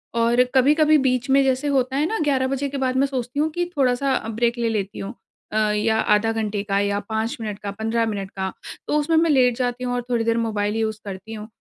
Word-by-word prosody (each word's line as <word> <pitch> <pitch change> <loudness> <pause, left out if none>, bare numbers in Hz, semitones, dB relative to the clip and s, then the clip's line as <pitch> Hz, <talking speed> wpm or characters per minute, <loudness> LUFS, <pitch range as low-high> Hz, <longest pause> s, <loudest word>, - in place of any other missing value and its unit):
और 235 +2 +4
कभी-कभी 300 +4 +5
बीच 255 -1 0
में 275 +1 +5
जैसे 265 +2 0
होता 265 -1 +1
है 295 +2 +2
ना, 445 - -2
11 270 -2 +1
के 275 - -5
बाद 260 -1 0
मैं 275 +1 +3
सोचती 260 0 -4
हूँ 310 +1 +2
कि 350 +2 -1
थोड़ा-सा 265 +1 +2
अ, 225 - -2
ब्रेक 235 +2 0
ले 235 -1 0
लेती 205 -3 -3
हूँ। 195 +4 -5 0.4
अ, 215 - -1
या 220 +1 +1
आधा 210 +2 +2
घंटे 215 -2 -2
का 200 -1 0
या 200 0 0
5 220 +5 -2
मिनट 210 -2 -5
का 200 - -5
15 225 +2 -1
मिनट 200 -3 -4
का। 190 -1 -3 0.4
तो 300 - +1
उसमें 320 +2 +1
मैं 330 0 +3
लेट 250 -4 +4
जाती 250 0 -2
हूँ, 245 0 -1
और 245 - -1
थोड़ी 235 -2 +1
देर 230 0 +1
मोबाइल 210 -2 -1
यूज़ 220 -1 -1
करती 195 +3 -7
हूँ। 215 0 -7
235 Hz, 240 wpm, -22 LUFS, 215-270 Hz, 0.4 s, कभी-कभी